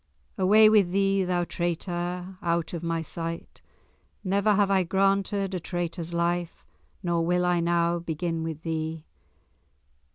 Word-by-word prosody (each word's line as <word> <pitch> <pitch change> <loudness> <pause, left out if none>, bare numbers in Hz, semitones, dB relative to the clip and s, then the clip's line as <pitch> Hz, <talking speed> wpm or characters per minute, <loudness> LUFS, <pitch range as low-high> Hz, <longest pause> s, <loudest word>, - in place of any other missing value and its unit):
"Away 210 +3 +6
with 210 -4 +5
thee, 195 0 +2
thou 180 -1 0
traitor, 175 +1 -3
out 170 -1 -1
of 170 - -4
my 165 -1 -2
sight! 165 +1 -6 0.6
Never 200 +2 +2
have 200 -1 +2
I 190 -1 +4
granted 195 +1 +1
a 185 - -1
traitor's 170 -1 -4
life, 170 0 -2 0.4
nor 170 -1 +1
will 180 +1 +1
I 175 -1 +2
now 170 0 +1
begin 165 0 -3
with 160 -1 -5
thee!" 160 -1 -3
175 Hz, 135 wpm, -26 LUFS, 170-190 Hz, 0.6 s, Away